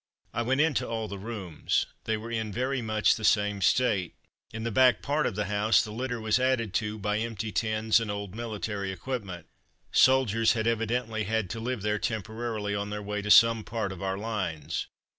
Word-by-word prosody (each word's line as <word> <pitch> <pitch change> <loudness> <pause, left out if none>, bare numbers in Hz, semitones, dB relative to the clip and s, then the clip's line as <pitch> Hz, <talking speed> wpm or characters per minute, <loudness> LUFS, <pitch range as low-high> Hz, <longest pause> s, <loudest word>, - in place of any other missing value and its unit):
I 120 - -1
went 130 +4 +2
into 155 -4 +1
all 110 -1 -3
the 100 -1 -7
rooms; 95 -7 -2 0.2
they 110 0 0
were 115 +2 -7
in 110 -2 -2
very 130 +4 -1
much 110 -1 +2
the 110 - -6
same 105 -2 +2
state. 100 -3 +2 0.4
In 110 0 -5
the 115 - -2
back 130 +3 +4
part 145 +2 +1
of 105 - -3
the 105 - -1
house 105 +1 +3
the 105 - -7
litter 120 +2 -3
was 110 +2 +1
added 125 -6 +1
to 105 0 -4
by 105 0 -1
empty 110 -1 -3
tins 110 0 +2
and 115 -2 -4
old 100 -2 -4
military 105 -3 -4
equipment. 95 -5 -5 0.5
Soldiers 115 -4 +4
had 110 -2 -1
evidently 115 -1 0
had 110 -2 -1
to 115 - -4
live 120 -2 -3
there 105 0 0
temporarily 110 -1 -3
on 100 0 -2
their 105 0 -4
way 105 0 -3
to 105 - -5
some 115 0 +7
part 110 -3 -3
of 95 - -8
our 95 0 -2
lines. 100 -8 -3
110 Hz, 200 wpm, -28 LUFS, 105-115 Hz, 0.5 s, some